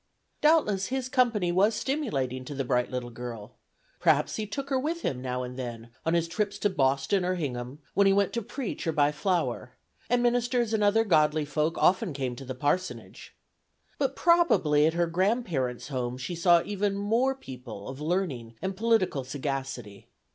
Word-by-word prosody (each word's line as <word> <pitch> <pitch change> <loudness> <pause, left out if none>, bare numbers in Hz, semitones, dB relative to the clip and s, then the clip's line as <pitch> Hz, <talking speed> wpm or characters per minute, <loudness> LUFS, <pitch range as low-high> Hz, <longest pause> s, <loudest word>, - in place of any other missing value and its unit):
Doubtless 215 -12 +3
his 260 -1 -2
company 230 -9 +2
was 200 +5 +3
stimulating 140 - -2
to 145 - -6
the 135 - -1
bright 125 -1 +1
little 125 -1 -4
girl; 115 -3 -7 0.5
perhaps - - +2
he 215 -1 -3
took 275 +7 -5
her 265 - +2
with 325 +5 -2
him 125 -2 -2
now 125 0 -2
and 125 +1 -7
then 120 -2 -6 0.2
on 165 - +3
his 170 -1 +1
trips 200 +3 -2
to 205 -1 +1
Boston 135 +5 +1
or 185 +1 0
Hingham, 130 -5 -4 0.2
when 200 0 +4
he - - +5
went 200 0 +2
to 235 - -1
preach 230 -4 -5
or 160 - +1
to - - -13
buy 145 -1 +4
"Flower"; 170 +4 -1 0.4
and 245 0 +2
ministers 240 -1 +1
and 215 -1 +2
other 210 +2 +4
godly 155 -6 +3
folk 150 +3 -1
often 185 -2 +3
came 130 -3 -3
to 135 - -8
the 130 0 -5
parsonage. 145 +8 -3 0.6
But 275 -1 0
probably 250 - +4
at 160 - 0
her 170 0 +2
grandparents' 170 - -1
home 125 -2 -3
she 135 +7 -5
saw 170 0 +4
even 205 -1 -1
more 230 +7 +1
people 125 - -9
of 135 +2 -7
learning 150 -9 -2
and 190 0 -3
political 205 - +1
sagacity. 135 -6 -5
170 Hz, 185 wpm, -28 LUFS, 130-215 Hz, 0.6 s, he